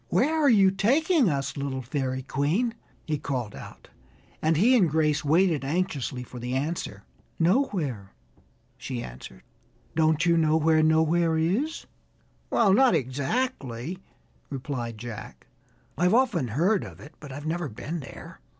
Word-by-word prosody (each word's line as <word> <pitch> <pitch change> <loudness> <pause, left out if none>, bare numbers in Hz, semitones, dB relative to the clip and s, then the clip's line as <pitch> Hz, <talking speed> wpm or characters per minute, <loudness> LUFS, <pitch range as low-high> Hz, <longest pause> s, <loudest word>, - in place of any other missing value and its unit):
Where 255 - +2
are 285 - +5
you 195 -5 +5
taking 265 - +3
us, 140 -2 -2
little 140 -2 -3
Fairy 130 0 -2
Queen?" 160 - 0 0.3
he 150 -2 -2
called 125 -8 -3
out, - - -11 0.5
and 160 0 +2
he 235 +9 +5
and 190 -9 +4
Grace 150 0 +1
waited 160 0 +2
anxiously 145 -5 -2
for 125 0 -10
the 125 +2 -3
answer. 135 -8 -3 0.3
"Nowhere!" 165 - 0 0.7
she - - -5
answered. 60 0 -10 0.5
"Don't 160 +1 +2
you 170 -1 +4
know 160 -1 +3
where 160 0 +3
Nowhere 160 +1 +3
is?" 205 - -1 0.6
"Well, 210 -5 +4
not 260 +4 +5
exactly," 140 - -2 0.5
replied 125 -4 -4
Jack. 115 -1 -9 0.5
"I've 180 +7 +3
often 230 - +2
heard 175 - +1
of - - -10
it, 145 - -12
but 150 -2 -10
I've 145 +3 -7
never 165 -1 -2
been 155 +9 -5
there." 135 - -11
155 Hz, 140 wpm, -26 LUFS, 135-185 Hz, 0.7 s, are